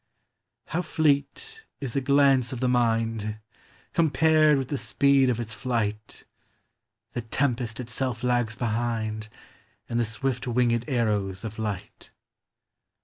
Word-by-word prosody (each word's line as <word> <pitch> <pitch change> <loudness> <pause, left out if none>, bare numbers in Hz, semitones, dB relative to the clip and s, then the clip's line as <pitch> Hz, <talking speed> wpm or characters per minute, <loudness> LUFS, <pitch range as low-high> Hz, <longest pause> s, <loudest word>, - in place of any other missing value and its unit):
How 175 - -2
fleet 160 - 0 0.2
is 135 -5 -5
a 140 - +2
glance 135 -2 +4
of 130 - -4
the 130 - +1
mind! 115 -3 +1 0.6
Compared 155 -1 +4
with 135 -2 -3
the 145 - -1
speed 140 -2 +3
of 120 -2 0
its 110 -2 -4
flight, 110 -5 -3 0.9
The 120 - -2
tempest 120 -1 -1
itself 125 0 -1
lags 120 -3 +1
behind, 110 -2 -2 0.6
And 120 - -1
the 120 - +2
swift 125 +3 -3
winged 120 -1 +1
arrows 105 -6 0
of 110 0 -6
light. 105 -4 -5
120 Hz, 125 wpm, -26 LUFS, 110-135 Hz, 0.9 s, glance